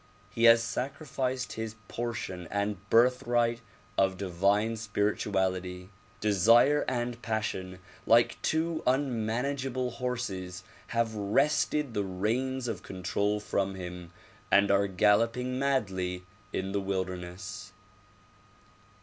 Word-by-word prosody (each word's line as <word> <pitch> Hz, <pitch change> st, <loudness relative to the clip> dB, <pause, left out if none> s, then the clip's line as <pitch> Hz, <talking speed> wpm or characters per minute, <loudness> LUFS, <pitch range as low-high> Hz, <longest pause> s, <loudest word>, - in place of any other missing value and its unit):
He 115 Hz, +2 st, +2 dB
has 115 Hz, 0 st, +8 dB
sacrificed 130 Hz, +1 st, -3 dB
his 110 Hz, 0 st, -5 dB
portion 110 Hz, -7 st, -4 dB
and 100 Hz, -1 st, -2 dB
birthright 120 Hz, 0 st, +3 dB, 0.4 s
of 95 Hz, -1 st, +2 dB
divine 100 Hz, +4 st, +1 dB
spirituality. 95 Hz, -3 st, -1 dB, 0.3 s
Desire 115 Hz, +8 st, +5 dB
and 120 Hz, -1 st, -2 dB
passion 95 Hz, -5 st, -3 dB, 0.3 s
like 115 Hz, +1 st, +4 dB
two 160 Hz, +1 st, 0 dB
unmanageable 130 Hz, 0 st, 0 dB
horses 100 Hz, -8 st, -4 dB, 0.2 s
have 115 Hz, -1 st, 0 dB
wrested 135 Hz, +6 st, +1 dB
the 105 Hz, -, 0 dB
reins 120 Hz, +7 st, -1 dB
of 105 Hz, -5 st, -3 dB
control 100 Hz, +3 st, -1 dB
from 100 Hz, -2 st, -1 dB
him 90 Hz, -2 st, -7 dB, 0.4 s
and 100 Hz, 0 st, +5 dB
are 100 Hz, 0 st, +3 dB
galloping 115 Hz, +6 st, +2 dB
madly 95 Hz, -10 st, -1 dB, 0.3 s
in 95 Hz, +1 st, -2 dB
the 100 Hz, 0 st, 0 dB
wilderness. 95 Hz, +1 st, -4 dB
105 Hz, 100 wpm, -29 LUFS, 95-125 Hz, 0.4 s, has